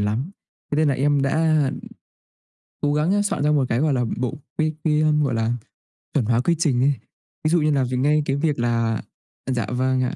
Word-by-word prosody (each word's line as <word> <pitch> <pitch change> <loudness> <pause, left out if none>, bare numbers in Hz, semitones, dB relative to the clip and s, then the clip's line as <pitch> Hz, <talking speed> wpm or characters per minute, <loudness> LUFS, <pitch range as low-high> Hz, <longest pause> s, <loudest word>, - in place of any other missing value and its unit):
lắm, 110 - -1 0.4
thế 145 - 0
nên 155 -1 +3
là 140 - +2
em 140 +1 +2
đã, 155 +1 +2
ừm, - - -4 1.0
cố 145 0 +1
gắng 155 +5 +1
á 205 0 +2
soạn 205 - -1
ra 150 - +2
một 140 -3 +3
cái, 115 - 0
gọi 150 -2 +2
là, 125 -1 +1
bộ 125 +2 -2 0.2
quy 155 0 +1
quy, 155 -1 +2
a, 155 - +3
gọi 130 - 0
là, 115 +1 0 0.6
chuẩn 135 -6 +1
hoá 115 +2 +2
quy 170 +5 +2
trình 130 -7 +2
ấy. 140 +1 +4 0.5
Ví - - +4
dụ 170 0 +3
như 150 0 +2
là 140 -2 +2
về 125 0 -2
ngay 150 +4 +3
cái 135 - 0
việc 145 -3 0
là 115 -1 +1 0.5
à, 130 - -1
dạ, 115 -4 -1
vâng 130 +1 +1
ạ, 125 - -2
140 Hz, 235 wpm, -22 LUFS, 125-155 Hz, 1.0 s, ấy